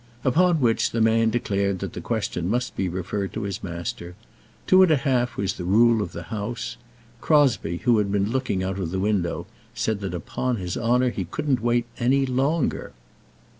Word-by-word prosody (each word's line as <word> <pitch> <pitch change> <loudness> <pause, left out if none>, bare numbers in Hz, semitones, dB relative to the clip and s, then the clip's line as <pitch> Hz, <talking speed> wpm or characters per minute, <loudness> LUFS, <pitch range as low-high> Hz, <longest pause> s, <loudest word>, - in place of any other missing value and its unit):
Upon 165 +4 +3
which 115 -3 +2
the 115 - -2
man 115 0 +3
declared 100 -4 0
the - - -6
question 90 0 -2
must 125 +3 -1
be 95 - -1
referred 95 +2 -3
to - - -4
his 100 -2 -4
master. 85 0 -5 0.5
Two 185 0 +6
and 185 - +6
a 155 - +5
half 130 -3 0
was 100 -1 -1
the 90 - -7
rule 110 +5 +4
of 90 - -4
the 85 0 -7
house. 110 +2 -4 0.5
Crosbie, 130 - +2
who 120 -4 +4
had 100 -2 0
been 100 +1 0
looking 125 -8 -1
out 95 +1 -3
of 90 -4 -2
the 95 - -3
window, 100 -3 -1 0.3
said 110 -2 -1
that 95 -3 -4
upon 125 - -2
his 90 -5 -4
honour 125 +2 +2
he 95 -5 -4
couldn't 135 - -1
wait 120 0 +1
any 135 +3 +3
longer. 135 +5 -1
110 Hz, 185 wpm, -24 LUFS, 95-125 Hz, 0.5 s, Two